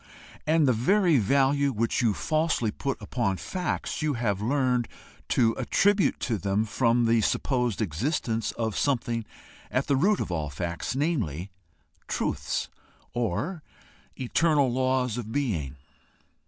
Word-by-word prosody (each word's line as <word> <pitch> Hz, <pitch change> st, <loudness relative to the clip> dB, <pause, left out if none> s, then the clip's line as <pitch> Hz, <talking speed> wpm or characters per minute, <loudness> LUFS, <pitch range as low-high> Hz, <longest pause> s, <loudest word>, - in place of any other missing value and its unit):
And 155 Hz, -1 st, +4 dB
the 130 Hz, -, +4 dB
very 170 Hz, -, +3 dB
value 140 Hz, +5 st, +3 dB
which 115 Hz, -1 st, 0 dB
you 110 Hz, -4 st, +2 dB
falsely 155 Hz, -8 st, 0 dB
put 135 Hz, +4 st, -3 dB
upon 105 Hz, -7 st, -1 dB
facts 180 Hz, -, -3 dB
you 150 Hz, -2 st, 0 dB
have 105 Hz, -5 st, -1 dB
learned 125 Hz, 0 st, +1 dB, 0.4 s
to 115 Hz, -3 st, +3 dB
attribute 200 Hz, -, +2 dB
to 115 Hz, -5 st, -1 dB
them 100 Hz, +3 st, 0 dB
from 115 Hz, +1 st, +2 dB
the 115 Hz, 0 st, +3 dB
supposed 125 Hz, -1 st, 0 dB
existence 115 Hz, -, -1 dB
of 110 Hz, -2 st, -2 dB
something 120 Hz, -5 st, 0 dB, 0.4 s
at 130 Hz, -, 0 dB
the 140 Hz, -, +2 dB
root 190 Hz, +9 st, +3 dB
of -, -, -3 dB
all 80 Hz, -3 st, -2 dB
facts 85 Hz, -, -4 dB
namely, 105 Hz, -, -1 dB, 0.6 s
TRUTHS, -, -, -2 dB, 0.5 s
or 120 Hz, -, -2 dB, 0.6 s
eternal 140 Hz, 0 st, +2 dB
laws 130 Hz, -2 st, +1 dB
of 110 Hz, -2 st, -6 dB
being. 95 Hz, -, -1 dB
125 Hz, 130 wpm, -27 LUFS, 110-140 Hz, 0.6 s, And